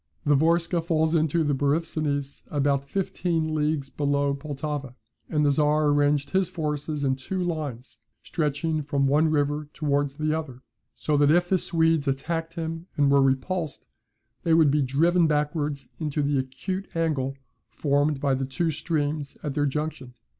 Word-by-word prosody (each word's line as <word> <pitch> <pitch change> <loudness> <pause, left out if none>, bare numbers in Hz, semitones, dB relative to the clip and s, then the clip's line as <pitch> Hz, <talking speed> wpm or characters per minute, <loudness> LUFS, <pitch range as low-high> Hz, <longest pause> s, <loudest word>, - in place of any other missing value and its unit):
The 145 - +4
Vorskla 165 +3 +2
falls 160 -1 +1
into 160 0 +2
the 145 -1 +1
Borysthenes 145 0 -1
about 140 -1 0
fifteen 170 -4 -1
leagues 150 -2 -1
below 140 -1 +1
Pultowa, 140 -2 -5 0.3
and 150 -1 +1
the 145 - +4
Czar 150 +1 +3
arranged 145 0 +2
his 190 -2 +2
forces 150 -2 -3
in 130 -1 +2
two 160 +8 -4
lines, 150 -8 -4 0.2
stretching 155 0 -1
from 140 -1 0
one 150 +4 +3
river 145 0 0
towards 145 -2 0
the 155 +1 0
other; 135 -5 -6 0.3
so 150 -1 0
that 145 0 +4
if 175 +3 +3
the 190 - +3
Swedes 165 -4 +1
attacked 165 +4 -2
him 165 +1 -4
and 140 -1 +4
were 140 0 +5
repulsed, 140 +5 -1 0.6
they 165 -2 +3
would 160 -4 +5
be 150 +1 +2
driven 165 +6 +3
backwards 150 -1 -1
into 150 -2 -1
the 140 -1 +1
acute 155 +10 -5
angle 140 -5 0 0.3
formed 145 0 +1
by 140 -1 +1
the 130 0 -1
two 160 +5 0
streams 150 -2 -2
at 145 - -2
their 145 0 +1
junction. 140 -3 -4
150 Hz, 160 wpm, -26 LUFS, 140-160 Hz, 0.6 s, were